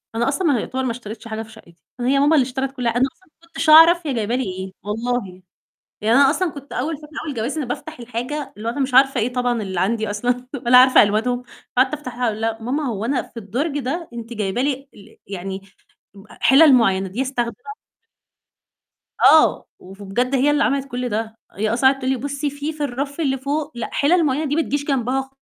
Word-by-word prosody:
أنا 235 +2 0
أصلًا 335 +6 0
ما 275 -7 +2
يعتبر 260 +4 -3
ما 255 - -1
اشتريتش 230 -1 -8
حاجة 220 0 -4
في 220 - -15
شقتي، 195 -6 -17 0.2
هي 265 +3 +2
ماما 295 +3 +4
اللي 265 -4 +4
اشترِت 265 +1 -3
كل 250 -3 -3
أنا 245 +3 +2
أصلًا 375 - -30
ما 335 - -21
كنتش 330 -1 -2
أعرف 325 +1 +7
هي 275 - -1
جايبة 230 +1 -1
لي 260 - 0
إيه 190 -1 -5
والله. 210 -3 -3 0.6
يعني 220 +2 +2
أنا 275 -1 +6
أصلًا 350 +3 0
كنت 285 -1 -11
أول 300 +4 -2
فترة 300 0 -14 0.2
أول 290 - -4
جوازي، 235 +7 -3
أنا 265 - -3
بافتح 305 +3 -6
الحاجة 255 +4 -5
اللي 220 +2 -5
هو - - -1
أنا 285 - -5
مش 265 -1 -1
عارفة 270 -1 +5
إيه 245 +3 -1
طبعًا 245 -3 0
اللي 190 -3 -3
عندي 220 +2 0
أصلًا 245 +4 -1 0.2
ولا 250 +1 +7
عارفة 255 0 +7
ألوانهم، 225 +4 0 0.3
فقعدت 260 +3 +3
أفتحها، 250 -4 -4
أقول 215 -1 -2
لها: 225 0 -1
"ماما، 275 +6 -2
هو 220 -3 -3
أنا 265 +2 0
في - - -19
الدرج 255 - -3
ده 305 +6 -3
أنتِ 235 0 -8
جايبة 210 +1 -2
لي 275 0 -2
ال 200 - -17
يعني 195 0 -6 0.5
ب 195 -1 -14 0.2
حلل 280 +2 +6
معيّنة، 195 -6 +2
دي 225 +8 -2
أستخدمها؟" 245 - -4 1.5
آه، 315 - +4
وبجد 200 +7 -3
هي 280 +3 +3
اللي 290 -1 +2
عملت 275 0 0
كل 250 0 -3
ده. 220 +1 -3
هي 215 +3 -1
أصلًا 265 +2 +5
قعدت 270 0 -2
تقول 260 0 -1
لي: 265 - 0
"بُصّي 285 +3 -3 0.2
في 305 -1 -5
الرف 280 +3 -4
اللي 270 -4 0
فوق، 285 +3 -3
لأ، 235 - -4
حلل 330 +3 +3
معيّنة 290 +3 0
دي 290 - -1
ما 330 - +3
تجيش 285 -2 -2
جنبها 265 0 -1
250 Hz, 215 wpm, -21 LUFS, 225-280 Hz, 1.5 s, أعرف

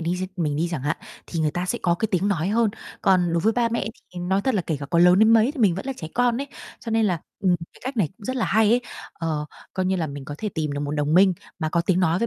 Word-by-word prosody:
đi 170 +2 -1
xem 185 0 -3
mình 150 -5 0
đi 170 +2 0
chẳng 155 -6 -3
hạn, 150 +3 0 0.3
thì 165 - -3
người 155 - +2
ta 175 +4 -3
sẽ - - -1
có 170 -2 +3
cái 220 +5 -1
tiếng 195 0 +1
nói 180 -2 0
hơn. 225 0 +2 0.3
Còn 180 -3 +3
đối 170 - +2
với 220 +4 +3
ba 235 0 +1
mẹ 230 -4 -2 0.3
thì 175 - -5
nói 190 +2 +1
thật 260 -3 +1
là 190 - +1
kể 160 - 0
cả 140 - -5
có 170 +4 +1
lớn 180 +2 +6
đến 220 +1 +6
mấy 225 +3 +5
thì 290 - -6
mình 200 -6 +4
vẫn 195 - -6
là 270 - -1
trẻ 160 - -6
con 245 -1 +2
ấy. 280 - -3 0.3
Cho 230 - -6
nên 225 -1 +3
là, 175 -4 0 0.2
ừm, 180 -2 +3 0.2
cái - - -19
cách 260 0 -4
này 195 -8 +2
cũng 210 - -15
rất 260 +3 -2
là 240 - +1
hay 215 +1 +3
ấy, 245 - +4 0.3
ờ, 155 -3 -3 0.3
coi 185 -1 0
như 190 0 +1
là 165 -3 -1
mình 140 -1 -7
có 145 - -6
thể 215 - -2
tìm 155 -5 -2
được 145 - -3
một 145 0 -2
đồng 150 +1 0
minh 190 +1 +6 0.3
mà 155 -3 -1
có 170 +2 +1
tiếng 180 +1 +1
nói 175 -1 +2
với 235 - +1
180 Hz, 325 wpm, -24 LUFS, 165-220 Hz, 0.3 s, lớn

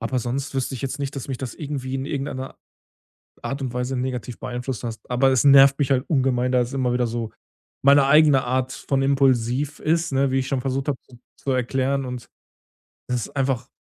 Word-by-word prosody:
aber 125 +2 -1
sonst 135 +4 -3
wüsste 135 0 -2
ich 125 - -7
jetzt 135 +1 -3
nicht, 140 0 -4
dass 135 - -5
mich 130 -2 -4
das 130 -4 -5
irgendwie 140 -3 -5
in 135 0 -2
irgendeiner 135 -3 -4 0.9
Art 135 +1 -4
und 125 -2 -3
Weise 125 +1 -2
negativ 125 -2 -4
beeinflusst 125 -1 -5
hast. 115 -2 -7
Aber 125 +2 +3
es 130 - +3
nervt 140 0 +7
mich 140 -1 +1
halt 130 -1 +2
ungemein, 130 -4 +1
da 125 - +3
es 125 +2 -2
immer 130 -2 0
wieder 125 0 +1
so 115 -1 -4 0.5
meine 140 0 +6
eigene 150 -2 +5
Art 130 +1 -1
von 135 -2 -1
impulsiv 135 0 +1
ist, 165 0 0
ne, 135 0 +1
wie 135 - +2
ich 130 - -2
schon 130 -1 -1
versucht 135 +2 -2
habe 140 - -1
zu 125 - -16 0.2
zu 135 - -3
erklären, 130 +2 0
und 125 -2 -6 0.8
das 125 - 0
ist - - -16
einfach 135 -3 -1
130 Hz, 210 wpm, -23 LUFS, 125-135 Hz, 0.9 s, nervt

